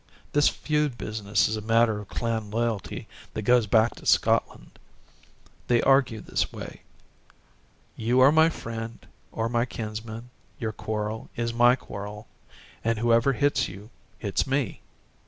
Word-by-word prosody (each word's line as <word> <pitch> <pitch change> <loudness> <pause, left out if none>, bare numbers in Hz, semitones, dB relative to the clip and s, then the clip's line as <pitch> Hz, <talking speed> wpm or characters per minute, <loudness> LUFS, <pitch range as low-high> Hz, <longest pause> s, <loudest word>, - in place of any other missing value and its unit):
This 145 0 +4
feud 150 -4 -1
business 105 -2 0
is 110 - -1
a 110 - -4
matter 115 0 +3
of 105 - -9
clan 115 -2 -2
loyalty 115 -1 -2 0.3
that 110 - -3
goes 120 0 +4
back 110 +2 +4
to - - -12
Scotland. - - +1 0.9
They 120 -1 +4
argue 135 -5 +3
this - - -1
way: - - -9 1.1
You 120 +3 +1
are 135 +2 +8
my 160 +1 +5
friend 115 -5 -6 0.3
or 115 0 -1
my 120 0 +1
kinsman, 110 +1 -6 0.3
your 110 -2 -3
quarrel 110 +1 -4
is 115 0 -2
my 120 +1 +5
quarrel, 105 -3 -8 0.6
and 115 0 +1
whoever 115 +3 +3
hits 145 +2 +1
you 100 +4 -11 0.3
hits 100 +3 -1
me. 135 -4 -1
115 Hz, 140 wpm, -26 LUFS, 110-125 Hz, 1.1 s, are